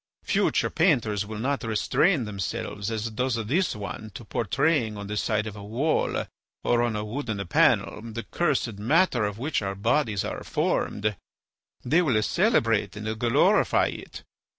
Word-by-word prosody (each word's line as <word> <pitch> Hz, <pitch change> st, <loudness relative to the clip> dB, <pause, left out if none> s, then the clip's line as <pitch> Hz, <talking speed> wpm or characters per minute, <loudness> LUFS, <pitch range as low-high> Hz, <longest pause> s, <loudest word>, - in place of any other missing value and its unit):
Future -, -, +1 dB
painters 105 Hz, -3 st, +2 dB
will 110 Hz, 0 st, -6 dB
not 135 Hz, +4 st, -1 dB
restrain 120 Hz, -, +2 dB
themselves 100 Hz, 0 st, -4 dB
as 110 Hz, 0 st, -3 dB
does 125 Hz, +2 st, -1 dB
this 165 Hz, -, +1 dB
one 105 Hz, +1 st, -6 dB
to 115 Hz, -, -8 dB
portraying 115 Hz, -, 0 dB
on 100 Hz, -, -6 dB
the 105 Hz, +1 st, -4 dB
side 105 Hz, 0 st, 0 dB
of 110 Hz, -2 st, -6 dB
a 100 Hz, -, -9 dB
wall 125 Hz, +10 st, 0 dB, 0.4 s
or 120 Hz, 0 st, +2 dB
on 120 Hz, -2 st, 0 dB
a 105 Hz, 0 st, -3 dB
wooden 110 Hz, -4 st, -3 dB
panel 90 Hz, -, +2 dB
the 115 Hz, 0 st, -6 dB
cursed 120 Hz, -6 st, -1 dB
matter 125 Hz, -, +3 dB
of 105 Hz, 0 st, -3 dB
which 140 Hz, +3 st, -1 dB
our 100 Hz, -1 st, -3 dB
bodies 105 Hz, 0 st, +1 dB
are -, -, -5 dB
formed; 105 Hz, 0 st, -1 dB, 0.7 s
they 155 Hz, +8 st, +4 dB
will 130 Hz, -10 st, +2 dB
celebrate 115 Hz, -, +2 dB
and 110 Hz, +1 st, -4 dB
glorify 120 Hz, 0 st, +3 dB
it. -, -, -9 dB
110 Hz, 155 wpm, -26 LUFS, 105-130 Hz, 0.7 s, they